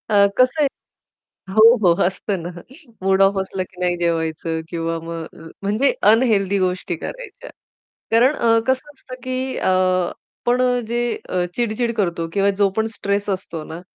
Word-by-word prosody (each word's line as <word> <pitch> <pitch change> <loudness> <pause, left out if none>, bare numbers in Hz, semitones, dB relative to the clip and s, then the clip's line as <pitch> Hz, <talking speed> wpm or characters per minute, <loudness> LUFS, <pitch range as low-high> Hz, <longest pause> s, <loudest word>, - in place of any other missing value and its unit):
अ, 200 -2 +5
कसं 255 +5 +3
आहे - - +4 0.9
हो, 225 +3 +7
हो. 175 -4 +5
असतं 190 +1 -2
ना. 175 - -4 0.5
मूड 190 0 +3
ऑफ 195 0 +4
असलं 190 0 -4
की 180 - -18
नाही 175 -1 +1
जेवायचं 165 -1 -1
किंवा 165 -1 -2
मग 165 -1 -5 0.2
अ, 165 - -10
म्हणजे 210 +8 +1 0.2
अनहेल्थी 205 -4 +2
गोष्टी 185 -1 -1
करायच्या. - - -8 0.6
कारण 245 +6 +4
अ, 230 -3 +3
कसं 260 +2 0
असतं, 260 -2 -11
की 255 0 -3
अ, - - -1
आपण 185 +6 0 0.3
जे 240 +1 -1 0.3
अ, 180 -1 0
चिड-चिड 235 0 -1
करतो 170 -5 -1
किंवा 200 0 +2
जो 200 -1 +4
पण 220 - +2
स्ट्रेस 200 +1 -1
असतो 185 -4 -4
ना, 160 +2 -8
195 Hz, 160 wpm, -20 LUFS, 175-235 Hz, 0.9 s, हो